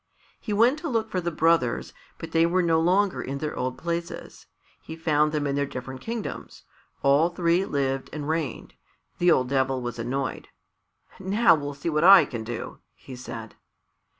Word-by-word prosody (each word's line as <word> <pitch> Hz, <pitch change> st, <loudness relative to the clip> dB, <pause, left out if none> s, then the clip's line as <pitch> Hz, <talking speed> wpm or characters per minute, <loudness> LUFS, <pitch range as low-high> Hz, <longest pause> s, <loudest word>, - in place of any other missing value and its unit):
He 215 Hz, -, -6 dB
went 235 Hz, +8 st, +3 dB
to 325 Hz, -, -4 dB
look 225 Hz, -3 st, -1 dB
for 185 Hz, -, -1 dB
the 170 Hz, -, -1 dB
brothers, 165 Hz, -6 st, +1 dB, 0.2 s
but -, -, -8 dB
they 165 Hz, 0 st, +3 dB
were 180 Hz, +1 st, +1 dB
no 165 Hz, -1 st, +3 dB
longer 185 Hz, +4 st, +2 dB
in 135 Hz, +1 st, -4 dB
their 150 Hz, +1 st, -4 dB
old 130 Hz, 0 st, -3 dB
places. 170 Hz, 0 st, -5 dB, 0.3 s
He 160 Hz, -, -8 dB
found 150 Hz, -2 st, +1 dB
them 150 Hz, -1 st, -1 dB
in 140 Hz, -1 st, -1 dB
their 140 Hz, 0 st, 0 dB
different 130 Hz, 0 st, -7 dB
kingdoms. 230 Hz, -1 st, -6 dB, 0.4 s
All 140 Hz, +5 st, +4 dB
three 175 Hz, +1 st, +1 dB
lived 135 Hz, -3 st, -2 dB
and 150 Hz, -2 st, -5 dB
reigned. 160 Hz, -2 st, -3 dB, 0.5 s
The 175 Hz, -, +4 dB
old 130 Hz, -6 st, +3 dB
Devil 135 Hz, -1 st, +1 dB
was 120 Hz, -1 st, -5 dB
annoyed. 130 Hz, +3 st, -3 dB, 0.7 s
"Now 200 Hz, +5 st, +4 dB
we'll 145 Hz, -2 st, -3 dB
see 140 Hz, +4 st, -3 dB
what 150 Hz, +1 st, +1 dB
I 185 Hz, -3 st, +9 dB
can 115 Hz, -5 st, -6 dB
do!" 115 Hz, 0 st, -6 dB, 0.2 s
he 130 Hz, -, -11 dB
said. 125 Hz, 0 st, -8 dB
155 Hz, 180 wpm, -25 LUFS, 135-175 Hz, 0.7 s, I